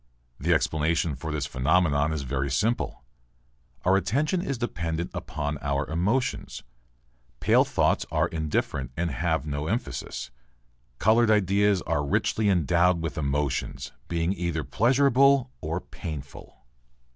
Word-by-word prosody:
The - - 0
explanation 80 +1 +1
for 80 +4 -5
this 75 -2 -2
phenomenon 75 +2 +2
is 75 -3 -2
very 70 +1 -2
simple. 75 - -1 0.8
Our 95 +2 +5
attention 140 - 0
is 140 -7 -3
dependent 85 -7 -3
upon 75 -1 -4
our 70 +1 -1
emotions. 95 - -1 0.8
Pale - - +4
thoughts - - +1
are - - +2
indifferent 75 -5 -2
and 85 0 -1
have 80 +4 -1
no 75 0 -3
emphasis. 105 - -4 0.7
Coloured 110 - +4
ideas 100 -2 +3
are 75 -3 0
richly 100 +8 +1
endowed 90 0 +3
with 80 -4 -4
emotions, 70 -1 -2 0.2
being 85 +2 0
either 85 -4 -2
pleasurable 135 - +3
or 80 +2 -2
painful. 75 -8 -9
85 Hz, 120 wpm, -26 LUFS, 75-100 Hz, 0.8 s, Our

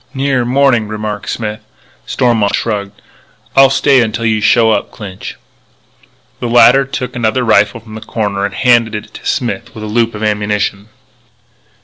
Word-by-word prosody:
"Nearer 135 -2 0
morning," 125 -3 +2
remarked 105 -1 -5
Smith. 110 -2 -4 0.5
Stormont 115 -5 +1
shrugged. 100 -2 -3 0.6
"I'll 135 0 +7
stay 135 -1 +3
until 115 0 -2
you 110 -1 +1
show 115 +1 +4
up, - - -1
Clinch." 95 -3 -9 1.0
The 120 - -3
latter 120 +3 +6
took 125 -1 -5
another 120 +1 0
rifle 105 0 +3
from 110 0 -13
the 110 - -8
corner 105 -4 -3
and 100 0 -3
handed 120 -3 +3
it 105 +1 -7
to - - -12
Smith 120 -2 -3
with 110 - -7
a - - -4
loop 115 +1 0
of 105 - -6
ammunition. 105 -1 -1
110 Hz, 155 wpm, -14 LUFS, 105-120 Hz, 1.0 s, I'll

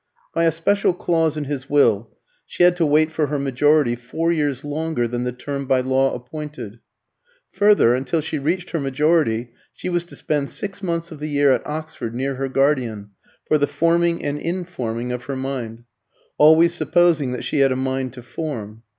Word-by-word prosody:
By 165 - +2
a 165 - +4
special 175 +3 +1
clause 165 -3 0
in 150 - -2
his 135 -2 -5
will, 115 -7 +3 0.4
she - - 0
had 175 0 +6
to 165 -3 +2
wait 155 +2 +3
for 155 -2 0
her 145 +1 -2
majority 140 -1 +2
four 160 +8 -2
years 145 -5 -1
longer 150 -4 -1
than 120 +1 -3
the 125 - -1
term 140 +2 -5
by 130 -1 +3
law 130 +1 +1
appointed. 125 -3 -8 0.7
Further, 205 - +4
until 135 +6 0
she 155 0 -3
reached 175 +6 -2
her 165 - -1
majority 135 -4 +1 0.2
she - - -5
was 175 -1 0
to - - -13
spend 145 -2 -2
six 200 0 -6
months 170 -3 -3
of 155 - -9
the 150 +1 -4
year 145 -1 +3
at 125 - 0
Oxford, 150 -6 -5
near 135 +2 -1
her 135 +1 -3
guardian, 125 -7 0 0.3
for 155 - +2
the 145 - +2
forming 170 0 +1
and 145 0 -2
informing 130 -10 -3
of 125 0 -5
her 140 - -4
mind 125 -4 -5 0.6
always 160 +3 +6
supposing 170 -6 +2
that 125 - -5
she 150 - -1
had 135 -1 +4
a - - +1
mind 130 -1 -2
to 125 -2 -11
form. 115 -7 -6
145 Hz, 190 wpm, -21 LUFS, 125-160 Hz, 0.7 s, had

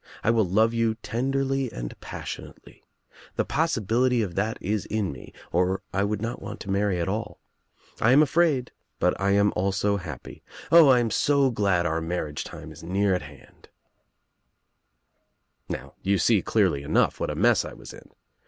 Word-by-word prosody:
I 115 - +3
will 110 -5 +2
love 110 +5 +3
you 115 -1 +1
tenderly 135 +3 -1
and - - -6
passionately. - - -9 0.5
The - - 0
possibility 125 - +1
of 95 -4 -4
that 105 +5 -1
is 105 +1 -2
in 105 -4 -1
me 65 -2 -11 0.2
or 90 +2 +1
1 100 +1 0
would 105 0 -2
not 120 +2 -4
want 100 +1 -7
to 95 - -5
marry 100 -2 +1
at 85 - -1
all. 105 +2 -4 0.6
I 115 - +4
am 145 +4 +7
afraid 150 -4 +1 0.3
but 90 - +2
I 100 0 +2
am 100 0 +3
also 100 +2 +1
happy. 80 -9 -9 0.3
O, 165 -4 +8
I 130 - +6
am 115 -2 -1
so 140 -2 +3
glad 100 -6 +1
our 80 0 0
marriage 80 -3 -3
time - - -10
is - - -12
near 95 +3 +1
at 90 - 0
hand - - -15 2.0
I' - - -1
"Now 70 +1 -8
you 100 +1 +1
see 105 +2 +3
clearly 95 -11 +1
enough 75 +3 +1
what - - -2
a - - -3
mess - - +3
I - - -8
was - - -11
in. - - -14
105 Hz, 180 wpm, -25 LUFS, 90-120 Hz, 2.0 s, O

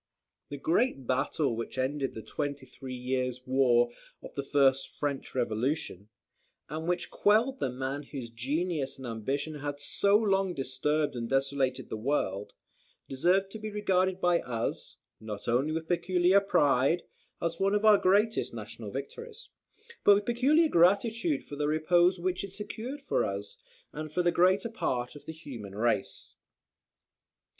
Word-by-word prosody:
The 145 - -5
great 160 - +1
battle 130 +1 0
which 115 +3 -5
ended 135 +1 -1
the 110 - -7
twenty 140 -2 -4
three 130 0 -8
years' 125 0 -2
war 125 -2 +3 0.3
of - - -10
the 140 - -2
first 135 -1 +3
French 140 -3 -4
Revolution, 115 - -2 0.6
and 160 +3 -4
which 175 0 -1
quelled 230 +6 +3
the - - 0
man 130 +3 -3
whose 135 -5 -7
genius 140 +4 -2
and 130 - -9
ambition 135 +7 -3
had 145 0 -4
so 200 +7 +3
long 195 -4 +1
disturbed 140 +2 0
and 115 -1 -4
desolated 135 -1 0
the - - -4
world, 105 -5 -1 0.5
deserves 180 +8 +2
to 220 - -7
be 215 0 -5
regarded 190 -3 +1
by 175 -2 +3
us, 115 -2 -4 0.2
not 105 -2 -7
only 125 +6 +2
with 160 0 -3
peculiar 180 +2 +3
pride, 145 -4 +2 0.4
as 165 0 -2
one 195 +1 +2
of 210 +1 +1
our 210 -2 +7
greatest 205 +4 +2
national - - -7
victories, 465 0 -7 0.5
but 205 - +8
with 205 0 -1
peculiar 275 +8 +3
gratitude 230 - +3
for 145 - -8
the 145 0 -1
repose 175 +4 +3
which 180 +1 -1
it 200 - -6
secured 220 +8 -6
for - - +1
us, 100 +1 -4 0.4
and 155 0 -6
for 180 +3 0
the 175 - +3
greater 185 +6 +3
part 125 - -2
of 145 - -12
the - - -4
human 125 -11 -9
race. 110 -2 -1
150 Hz, 155 wpm, -29 LUFS, 130-190 Hz, 0.6 s, but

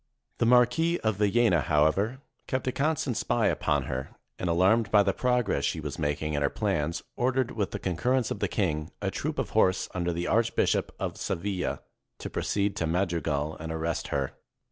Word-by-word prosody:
The 115 - +3
Marquis 125 +8 +4
of 110 -3 0
Villena, 105 -4 +3
however, 80 - +1 0.3
kept 130 -1 -1
a 130 - +1
constant 145 -2 0
spy 120 -1 +1
upon 75 -2 0
her, 65 +1 -4 0.3
and, 90 - -1
alarmed 95 +6 +3
by 105 -1 +5
the - - +1
prog 125 -3 +1
ress 70 - 0
she 80 - 0
was 75 -1 -5
making 75 +1 -1
in 70 - 0
her 70 - +2
plans, 75 +4 -1
ordered, 130 0 +1
with 105 -4 -1
the - - -4
con 90 -3 -3
currence 125 +2 +1
of - - -3
the - - +1
king, 75 -7 -1
a - - -2
troop - - -3
of - - -2
horse 95 0 +3
under 90 -1 -1
the 85 +1 -2
Arch 115 0 +1
bishop - - +1
of - - -3
Seville, 90 +1 -2 0.3
to - - -6
proceed 100 0 0
to 85 - 0
Madrigal 80 -4 -1
and 80 +1 -5
arrest 80 +1 -2
her. 70 -2 -2
95 Hz, 195 wpm, -28 LUFS, 80-115 Hz, 0.3 s, by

